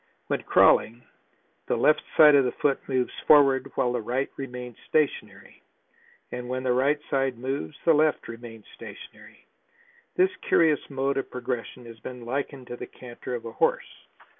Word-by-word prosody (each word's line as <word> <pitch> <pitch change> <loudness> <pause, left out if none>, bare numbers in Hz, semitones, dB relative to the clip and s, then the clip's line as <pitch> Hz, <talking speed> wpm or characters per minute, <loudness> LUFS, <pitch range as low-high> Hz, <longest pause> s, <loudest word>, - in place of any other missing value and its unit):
When - - -2
crawling, 120 +2 +3 0.6
the - - +1
left 150 0 +3 0.2
side 150 -2 +9
of 140 -1 +6
the 125 - 0
foot 140 -2 0
moves 130 -2 0
forward 135 -3 +5
while 125 - +1
the 120 - -1
right 125 +5 -2
remains 125 -3 -7
stationary, 155 -2 -2 0.7
and 125 0 -6
when 130 0 -3
the 130 - +1
right 140 +4 +2
side 135 -2 0
moves 125 - -4
the 165 - +6
left 155 0 +2
remains 115 -2 -10
stationary. - - -13 0.7
This 370 +1 +2
curious 160 -3 +4
mode 135 0 -1
of 135 - -3
progression 125 -1 -5
has 115 -1 -12
been 125 +2 -9
likened 135 +1 -4
to 120 - -6
the - - -7
canter 125 0 -8
of 115 - -7
a 115 - -6
horse. - - 0
130 Hz, 165 wpm, -26 LUFS, 120-140 Hz, 0.7 s, side